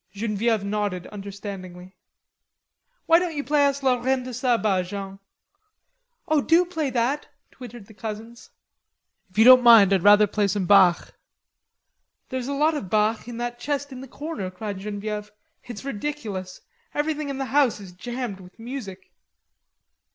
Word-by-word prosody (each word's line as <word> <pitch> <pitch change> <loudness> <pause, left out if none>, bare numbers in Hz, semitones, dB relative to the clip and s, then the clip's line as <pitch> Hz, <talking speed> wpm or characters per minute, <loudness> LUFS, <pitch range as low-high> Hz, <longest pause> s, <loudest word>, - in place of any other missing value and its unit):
Genevieve 215 +1 -1
nodded 200 -3 -2
understandingly. 195 -2 -9 1.1
"Why 330 +1 +6
don't 350 -3 -3
you 290 - -2
play 285 +1 +3
us 280 0 -2
La 250 -2 +2
Reine 260 0 0
de 255 0 -7
Saba, 230 -6 +1
Jean?" 195 +1 -7 1.1
"Oh, 310 -2 +2
do 335 +5 +4
play 320 -5 -2
that," 260 +4 -1 0.2
twittered 240 -4 -11
the 220 - -16
cousins. 225 +2 -8 0.8
"If 185 - -20
you 220 - +7
don't 255 +1 +9
mind, 225 -5 +7
I'd 190 - +2
rather 205 +2 +7
play 205 0 0
some 200 -1 -1
Bach." 185 -2 +4 1.2
"There's 260 -1 -4
a 280 - -2
lot 305 +3 +2
of 205 -12 -5
Bach 215 +2 +1
in 240 -1 -7
that 240 0 -4
chest 285 +1 -3
in 255 -1 -8
the 265 - -9
corner," 290 - -6
cried 200 +1 -6
Genevieve. 210 +1 -5 0.3
"It's 240 +1 -9
ridiculous; 210 -8 -5 0.3
everything 300 0 -2
in 275 - -4
the 270 - -2
house 280 -7 +3
is 195 -3 -11
jammed 240 +2 -6
with 180 0 -15
music." 225 -6 -8
225 Hz, 155 wpm, -24 LUFS, 200-270 Hz, 1.2 s, don't